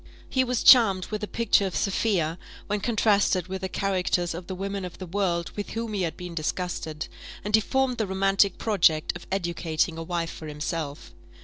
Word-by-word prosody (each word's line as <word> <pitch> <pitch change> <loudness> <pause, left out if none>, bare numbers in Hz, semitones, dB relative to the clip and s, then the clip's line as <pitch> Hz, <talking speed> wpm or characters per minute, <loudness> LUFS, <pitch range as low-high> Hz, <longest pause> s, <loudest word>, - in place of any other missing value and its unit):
He 260 - +2
was 250 -2 -1
charmed 200 -8 +7
with 215 0 -3
the 210 - -3
picture 225 -3 +2
of 185 - -6
Sophia, 185 -5 0 0.3
when 210 0 -1
contrasted 205 -4 +2
with 190 0 -5
the 190 - -3
characters 180 -3 0
of 170 +1 -7
the 190 - -4
women 195 +1 -4
of 180 -1 -7
the 185 - -6
world 175 -2 -1
with 205 - -4
whom 225 -1 -3
he 200 - -1
had 170 -3 -2
been 180 -1 -7
disgusted; 160 -1 -3 0.4
and 210 - -4
he 220 - +6
formed 265 +1 0
the 220 - 0
romantic 195 0 +2
project 170 -9 +2
of 175 - -9
educating 170 -3 -1
a - - -4
wife 170 0 -2
for 155 - -9
himself. 150 -1 -5
190 Hz, 195 wpm, -26 LUFS, 170-205 Hz, 0.4 s, charmed